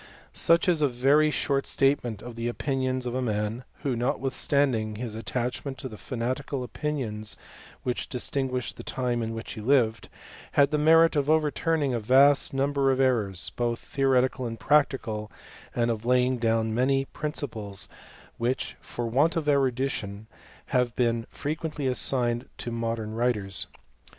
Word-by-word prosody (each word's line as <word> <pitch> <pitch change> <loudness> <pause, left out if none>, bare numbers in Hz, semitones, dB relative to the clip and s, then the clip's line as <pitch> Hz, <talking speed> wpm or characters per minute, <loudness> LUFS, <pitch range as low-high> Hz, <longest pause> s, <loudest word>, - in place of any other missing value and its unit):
Such 170 +3 +4
is 170 -4 +3
a 145 - +5
very 140 +5 +3
short 140 -2 0
statement 125 -6 +1
of 120 0 -7
the 115 +1 -3
opinions 130 0 -1
of 120 - -3
a 130 - -1
man, 110 +1 -2 0.2
who, 135 -3 0
notwithstanding 125 -2 0
his 115 0 -5
attachment 125 +4 -3
to 130 - -6
the 110 - -9
fa^ 125 +4 -7
natical 130 +3 -2
opinions 115 -6 -4 0.5
which 125 -1 -2
distinguished 125 +1 -2
the - - -8
time 125 -2 -1
in 115 0 -3
which 115 - -6
he 110 - -7
lived, 115 -2 +2 0.4
had 140 0 +4
the 150 - +1
merit 165 +2 +5
of 145 0 +1
overturning 155 -2 +1
a 120 - 0
vast 135 +5 +5
number 140 0 +1
of 130 - 0
errors, 110 -8 +2
both 120 -1 0
theoretical 130 -2 +1
and 115 -1 -6
practical; 125 -8 +1 0.4
and 120 -1 +2
of 110 -1 -4
laying 125 +1 +2
down 115 -1 +1
many 135 +3 +2
principles, 120 -10 -3 0.5
which, 125 +3 -1
for 120 - -5
want 140 +9 +2
of 165 -2 -1
erudition^ 130 -7 0 0.5
have 125 -2 +2
been 115 -1 0
frequently 155 -1 -4
assigned 125 -2 +2
to 120 - -4
modern 115 -2 -3
writers. 110 -5 0
125 Hz, 150 wpm, -27 LUFS, 115-140 Hz, 0.5 s, a